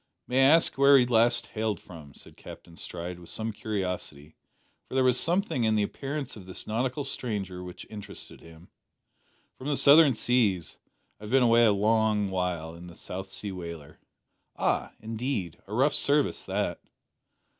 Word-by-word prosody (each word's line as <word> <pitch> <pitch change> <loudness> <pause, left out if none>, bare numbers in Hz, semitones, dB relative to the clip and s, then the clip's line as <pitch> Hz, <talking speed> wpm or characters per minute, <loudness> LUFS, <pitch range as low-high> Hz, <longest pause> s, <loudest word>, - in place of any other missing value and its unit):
"May 125 +1 +1
I 135 0 +6
ask 165 -4 +2
where 140 0 +7
you 125 - +4
last 120 0 +3
hailed 110 -4 -2
from?" 75 -6 -13
said - - -13
Captain 85 - -12
Stride, 90 +1 -6
with 85 - -12
some 110 0 -2
curiosity, 90 -8 -5 0.5
for - - -7
there 130 - +3
was 125 -1 +5
something 175 - 0
in 110 -1 +2
the 105 - +2
appearance 140 +5 -5
of 95 -4 -12
this 95 - -6
nautical 125 +6 -2
stranger 100 -9 -4
which 90 -1 -9
interested 105 -2 -10
him. 80 +1 -16 0.9
"From 130 - -7
the 145 - +1
southern 145 -2 +6
seas. 105 -10 0 0.4
I 105 - -10
have - - -7
been 135 -1 +4
away 120 0 +5
a 110 - +5
long 105 -1 +1
while 90 -3 -2
in 85 +1 -11
a 85 - -13
South 95 +1 -7
Sea 100 +1 -5
whaler." 85 -5 -9 0.6
"Ah, - - -1
indeed? 110 - -4
a 105 - -8
rough 135 +4 +3
service 145 0 +2
that." - - -2
110 Hz, 170 wpm, -27 LUFS, 90-125 Hz, 0.9 s, where